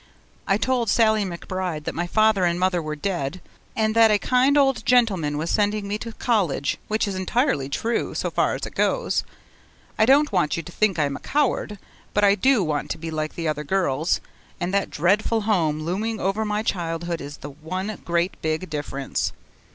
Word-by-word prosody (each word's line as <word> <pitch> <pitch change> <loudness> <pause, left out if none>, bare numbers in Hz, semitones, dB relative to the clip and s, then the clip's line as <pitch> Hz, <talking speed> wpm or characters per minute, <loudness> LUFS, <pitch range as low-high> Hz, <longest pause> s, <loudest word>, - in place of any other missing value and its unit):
I 195 - +3
told 245 -1 0
Sallie 220 0 +3
McBride 180 -2 -4
that - - -4
my 175 +1 -3
mother 215 -3 +4
and 175 0 +1
father 180 -1 +1
were 155 -1 -4
dead, 170 -1 -3 0.4
and 220 -1 +1
that 225 -1 +7
a 210 - +4
kind 255 +6 +3
old 270 -2 +3
gentleman 195 -12 +2
was 160 +2 -2
sending 210 -1 +1
me 205 +1 -2
to 230 - -6
college 185 - 0
which 215 0 0
is 200 - -2
entirely 185 - 0
true 225 +11 -1
so - - -2
far - - +1
as - - -4
it - - -9
goes. - - +1 0.8
I 220 - +5
don't 285 +2 +5
want 175 -6 +1
you 165 - -3
to 175 - -10
think 195 0 +1
I 150 - +2
am 140 -1 -3
a - - -12
coward, 270 -7 0 0.4
but 205 - +3
I 200 -1 +6
do 255 0 +3
want 150 -3 -2
to - - -3
be 165 0 -6
like 155 -1 -3
the 165 -1 -3
other 150 -1 -1
girls, 160 -2 0 0.4
and 175 +2 -2
that 200 0 +1
Dreadful 210 +7 +1
Home 165 -8 +1
looming 205 +7 -2
over 195 +4 0
my 210 0 -1
childhood 170 -3 -2
is 145 +1 -8
the 145 - -8
one 185 +8 -5
great 170 +1 -1
big 160 +2 -2
difference. 140 -2 -3
185 Hz, 200 wpm, -23 LUFS, 160-215 Hz, 0.8 s, that